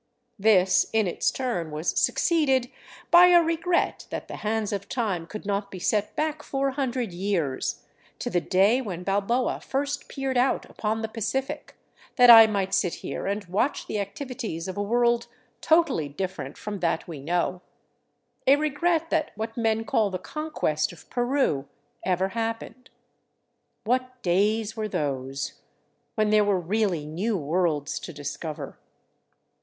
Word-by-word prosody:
This 190 Hz, -3 st, +4 dB
in 220 Hz, -1 st, +3 dB
its 175 Hz, -, 0 dB
turn 235 Hz, -11 st, -2 dB
was 155 Hz, +2 st, -2 dB
succeeded 270 Hz, -7 st, +2 dB, 0.4 s
by 350 Hz, +1 st, +9 dB
a 350 Hz, -1 st, +7 dB
regret 335 Hz, +2 st, 0 dB
that -, -, -5 dB
the -, -, -7 dB
hands 215 Hz, -1 st, -1 dB
of 200 Hz, -1 st, -4 dB
time 195 Hz, -9 st, -2 dB
could 215 Hz, +3 st, -8 dB
not 200 Hz, 0 st, -1 dB
be 190 Hz, -, -8 dB
set 210 Hz, +3 st, 0 dB
back 310 Hz, 0 st, -1 dB
400 265 Hz, -4 st, -2 dB
years, 175 Hz, -7 st, -2 dB, 0.3 s
to -, -, -4 dB
the 175 Hz, -, +1 dB
day 200 Hz, +9 st, +3 dB
when 180 Hz, -7 st, -5 dB
Balboa 205 Hz, +6 st, 0 dB
first 280 Hz, +1 st, -2 dB
peered 270 Hz, -2 st, -1 dB
out 260 Hz, +2 st, +1 dB
upon 220 Hz, +1 st, -3 dB
the -, -, -1 dB
Pacific, 265 Hz, +7 st, -3 dB, 0.4 s
that 245 Hz, -2 st, +8 dB
I 225 Hz, -1 st, +11 dB
might 200 Hz, -3 st, -1 dB
sit 180 Hz, -, +1 dB
here -, -, -4 dB
and 200 Hz, +1 st, -2 dB
watch 205 Hz, +10 st, -1 dB
the 210 Hz, -, -3 dB
activities 205 Hz, -, -5 dB
of 185 Hz, -, -5 dB
a 205 Hz, -, -2 dB
world 235 Hz, +2 st, +2 dB, 0.3 s
totally 315 Hz, -, +2 dB
dif 185 Hz, +6 st, -4 dB
ferent -, -, -7 dB
from 205 Hz, -2 st, -5 dB
that 165 Hz, -2 st, -1 dB
we 160 Hz, -4 st, -7 dB
know; 175 Hz, +4 st, -1 dB, 0.9 s
a 270 Hz, -, +8 dB
regret 310 Hz, +3 st, 0 dB
that 320 Hz, -2 st, +1 dB
what 220 Hz, +1 st, -5 dB
men 225 Hz, -1 st, 0 dB
call 210 Hz, -1 st, +2 dB
the 185 Hz, -, -3 dB
Conquest 180 Hz, -, -2 dB
of 175 Hz, -, -16 dB
Peru 245 Hz, -, 0 dB, 0.4 s
ever 185 Hz, +1 st, +1 dB
happened. 230 Hz, +3 st, -4 dB, 0.9 s
What 255 Hz, +2 st, -1 dB
days 210 Hz, +4 st, +1 dB
were 215 Hz, -1 st, -2 dB
those, 135 Hz, -5 st, -3 dB, 0.5 s
when 215 Hz, -2 st, +2 dB
there 215 Hz, 0 st, +5 dB
were 200 Hz, -2 st, +2 dB
really 180 Hz, -3 st, 0 dB
new 190 Hz, +8 st, -1 dB
worlds 155 Hz, -2 st, 0 dB
to -, -, -8 dB
discover! 145 Hz, +1 st, -6 dB
215 Hz, 150 wpm, -26 LUFS, 180-255 Hz, 0.9 s, I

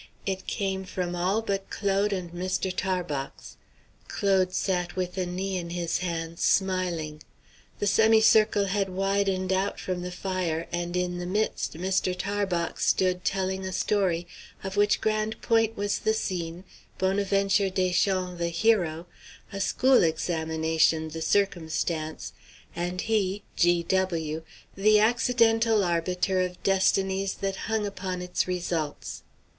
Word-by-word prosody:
It 190 Hz, -1 st, -3 dB
came 190 Hz, -1 st, -2 dB
from 180 Hz, -2 st, -3 dB
all 190 Hz, +5 st, 0 dB
but 195 Hz, -2 st, -2 dB
Claude 200 Hz, 0 st, 0 dB
and 180 Hz, -3 st, -3 dB
Mr. 185 Hz, +1 st, -2 dB
Tarbox. 175 Hz, -8 st, -3 dB, 0.5 s
Claude 190 Hz, -2 st, +1 dB
sat 180 Hz, -2 st, -1 dB
with 180 Hz, -1 st, -2 dB
a 185 Hz, -2 st, -1 dB
knee 190 Hz, +2 st, -2 dB
in 170 Hz, -1 st, -6 dB
his 170 Hz, -1 st, -1 dB
hands, 170 Hz, -2 st, -4 dB
smiling. 175 Hz, -5 st, 0 dB, 0.6 s
The -, -, -2 dB
semicircle 220 Hz, 0 st, +5 dB
had 195 Hz, 0 st, 0 dB
widened 195 Hz, 0 st, 0 dB
out 190 Hz, +2 st, -1 dB
from 180 Hz, -1 st, -3 dB
the 180 Hz, -, -4 dB
fire, 180 Hz, -3 st, -2 dB
and 175 Hz, +1 st, -2 dB
in 180 Hz, 0 st, -1 dB
the 175 Hz, -, -4 dB
midst 210 Hz, -1 st, -1 dB
Mr. 185 Hz, +1 st, 0 dB
Tarbox 190 Hz, -3 st, -1 dB
stood 180 Hz, -1 st, +2 dB
telling 190 Hz, 0 st, -1 dB
a 190 Hz, -, -4 dB
story, 185 Hz, -3 st, 0 dB, 0.4 s
of 190 Hz, 0 st, -4 dB
which 205 Hz, +1 st, +3 dB
Grande 215 Hz, 0 st, 0 dB
Pointe 225 Hz, -1 st, +2 dB
was 205 Hz, 0 st, -1 dB
the 220 Hz, -, +1 dB
scene, 175 Hz, -4 st, -3 dB, 0.3 s
Bonaventure 195 Hz, +1 st, +2 dB
Deschamps 185 Hz, -1 st, 0 dB
the 170 Hz, 0 st, 0 dB
hero, 170 Hz, -3 st, +1 dB, 0.5 s
a 195 Hz, -, -3 dB
school 260 Hz, +6 st, +4 dB
examination 160 Hz, -1 st, +1 dB
the 160 Hz, +1 st, -6 dB
circumstance, 160 Hz, -4 st, -1 dB, 0.4 s
and 175 Hz, +1 st, -2 dB
he, 205 Hz, -2 st, 0 dB
G. 175 Hz, 0 st, +3 dB
W., 165 Hz, -4 st, -1 dB, 0.3 s
the 210 Hz, +2 st, +5 dB
accidental 225 Hz, -1 st, +3 dB
arbiter 180 Hz, +2 st, 0 dB
of 180 Hz, -1 st, -4 dB
destinies 195 Hz, 0 st, +2 dB
that 195 Hz, -1 st, -2 dB
hung 220 Hz, -2 st, 0 dB
upon 185 Hz, -2 st, -4 dB
its 180 Hz, 0 st, -1 dB
results. 170 Hz, -4 st, -3 dB
185 Hz, 135 wpm, -27 LUFS, 175-200 Hz, 0.6 s, semicircle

